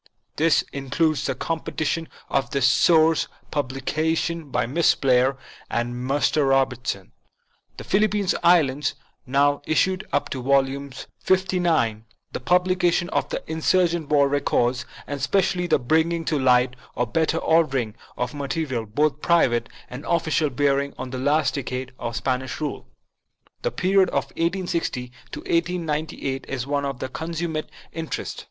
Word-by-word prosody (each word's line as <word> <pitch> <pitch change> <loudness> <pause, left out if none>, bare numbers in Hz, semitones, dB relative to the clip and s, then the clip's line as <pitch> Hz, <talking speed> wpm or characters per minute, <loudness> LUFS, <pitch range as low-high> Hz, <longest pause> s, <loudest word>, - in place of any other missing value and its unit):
This 160 -1 +3
includes 145 +3 0
the 135 - -1
completion 165 +2 -2 0.2
of 135 -3 0
the 140 - -1
source 160 +4 +4 0.2
publications 155 +4 -1
by - - +1
Miss 150 +7 +3
Blair 130 0 +3 0.3
and 120 +1 -1
Mr. 135 +3 +1
Robert 130 -2 +1
son, 95 -2 -3 0.7
The - - -7
Philippine 210 0 +1 0.2
Islands, 150 -5 +3 0.3
now 140 +2 +2
issued 185 +5 +2
up - - 0
to 130 - -3
Volume 140 +1 +1 0.3
XLIX; 175 - +2 0.3
the - - -4
publication 180 -1 +2
of - - -1
the - - -3
Insurgent 165 0 +1
War 145 -2 +4
Records; 130 -3 0 0.2
and 145 0 -5
especially 180 +1 +1
the - - +4
bringing 160 +5 +1
to 150 -2 0
light 125 -1 +3 0.2
or 120 - +1
better 160 +5 0
ordering 135 -10 +2 0.2
of 125 +2 -2
material, 140 -4 -3
both 145 +6 0
private 120 -9 +2 0.2
and 125 +3 -8
official, 160 -2 +1
bearing 140 +1 0
on 130 0 -6
the 130 - -4
last 150 +3 +2
decades 130 -2 -4
of 115 0 -4
Spanish 130 +1 -2
rule. 150 -1 -4 0.7
The 485 - 0
period 190 - +2
of - - 0
1860 170 -8 -2 0.2
to - - -5
1898 160 -5 -2
is 130 -2 -3
one 140 0 -1
of 135 -2 -4
consummate 160 -1 -3 0.2
in 165 -1 -5
terest. - - -4
145 Hz, 140 wpm, -24 LUFS, 130-165 Hz, 0.7 s, source